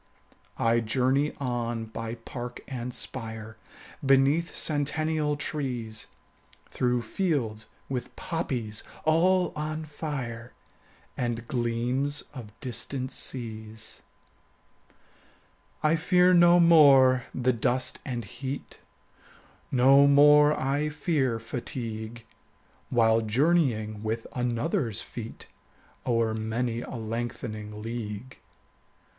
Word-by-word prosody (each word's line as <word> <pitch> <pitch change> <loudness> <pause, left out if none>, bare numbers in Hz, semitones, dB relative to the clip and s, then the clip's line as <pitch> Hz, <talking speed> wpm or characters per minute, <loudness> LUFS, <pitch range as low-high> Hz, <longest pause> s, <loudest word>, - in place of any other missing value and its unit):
20 115 - +2
I 115 - +4
journey 130 +6 +1
on 120 -3 -2
by 115 +1 -5
park 120 +1 -7
and 125 -2 -4
spire, 110 -3 -4 0.5
Beneath 135 +5 +3
centennial 150 0 0
trees, 125 -7 -3 0.6
Through 125 -1 0
fields 115 - -1 0.2
with 125 -2 -4
poppies 120 -10 -3 0.2
all 180 +3 +3
on 155 +1 -3
fire, 130 -6 -5 0.6
And 120 -1 -3
gleams 125 +4 0
of 120 -6 -9
distant 130 +1 -3
seas. 110 -3 -4 1.8
I 155 +1 +4
fear 180 +2 +4
no 175 0 +7
more 140 -7 +7
the 130 0 +1
dust 125 +2 0
and 120 -4 -4
heat, 130 +6 -6 0.9
25 - - -36
No 135 +3 +6
more 150 +1 +6
I 140 +3 0
fear 145 -5 0
fatigue, 115 -1 -6 0.6
While 115 -2 +4
journeying 115 -3 +1
with 110 +1 -2
another's 120 - -1
feet 115 -1 -8 0.6
O'er 115 -2 +2
many 115 +2 -2
a 130 - -7
lengthening 110 -2 -5
league. 115 +1 -6
125 Hz, 95 wpm, -27 LUFS, 115-145 Hz, 1.8 s, no